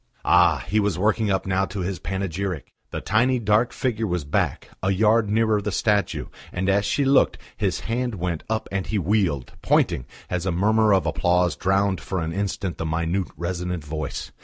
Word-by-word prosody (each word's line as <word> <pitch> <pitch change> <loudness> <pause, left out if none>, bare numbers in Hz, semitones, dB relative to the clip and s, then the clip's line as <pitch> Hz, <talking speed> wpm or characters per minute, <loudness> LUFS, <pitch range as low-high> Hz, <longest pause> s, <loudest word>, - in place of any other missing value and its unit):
Ah! 85 -6 +4
he 105 +3 +2
was 100 -4 0
working 110 +2 +1
up 95 -1 0
now 95 0 +1
to 95 +1 -5
his 90 +1 -3
panegyric! 95 -5 -3 0.2
The - - -5
tiny 120 +5 +2
dark 110 +1 +2
figure 115 -4 -1
was 90 -5 -2
back, 75 - -1
a 95 - 0
yard 105 +2 +3
nearer 110 -1 +2
the 105 +1 -2
statue, 105 0 +1 0.3
and 95 +1 -2
as 100 +1 +2
she 140 +7 +1
looked, 135 +1 +4 0.2
his - - -1
hand 120 0 -2
went 85 -3 -2
up 110 0 -1
and 95 -1 -2
he 110 - -1
wheeled, 95 - 0
pointing, 65 - +2 0.2
as 90 +1 -2
a - - +1
murmur 110 +5 +3
of 95 -2 +3
applause 90 -1 +2
drowned 95 0 +1
for 95 - -3
an 80 0 -3
instant 100 -1 -3
the 80 - -2
minute, 85 +3 -1
resonant 90 -1 -3
voice. 75 -1 -5
95 Hz, 185 wpm, -24 LUFS, 90-105 Hz, 0.3 s, Ah